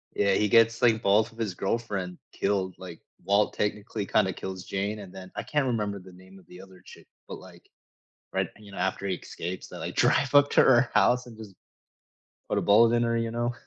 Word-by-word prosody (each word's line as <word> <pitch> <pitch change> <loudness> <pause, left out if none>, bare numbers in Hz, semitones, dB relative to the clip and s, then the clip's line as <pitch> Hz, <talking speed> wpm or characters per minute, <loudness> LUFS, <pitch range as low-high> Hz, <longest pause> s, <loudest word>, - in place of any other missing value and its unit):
Yeah. 100 -1 +2
He 105 +2 +2
gets, 115 +2 +4
like, 115 -2 +3
both 105 +3 +3
of 110 - -20
his 105 -5 -3
girlfriend 95 -3 -3
killed. 95 -2 -1
Like, 90 -3 -10 0.2
Walt 100 +1 +2
technically 105 0 -3
kinda 95 -2 +1
kills 95 -1 -7
Jane, 100 +2 -3
and 95 -3 -11
then 95 -1 -10
I - - -4
can't 145 -3 -1
remember 105 -4 -2
the 90 0 -15
name 95 +1 -16
of 90 - -22
the 90 +1 -12
other 95 -2 -16
chick. - - -15 0.2
But, - - -8
like, - - -16 0.6
right, - - 0
you 105 -2 -14
know, - - -10
after 95 +1 -2
he 95 - -1
escapes, 90 +2 -7
they, - - -10
like, - - -6
drive 140 +1 +2
up 145 0 +6
to - - +5
her 120 -1 +4
house 120 +5 +3
and 115 -3 -13
just 105 -4 -11 0.9
put - - 0
a - - +1
bullet 115 +3 +5
in 120 - +2
her, 115 0 0
you 115 0 -2
know? 120 +1 -2
105 Hz, 220 wpm, -27 LUFS, 95-115 Hz, 0.9 s, up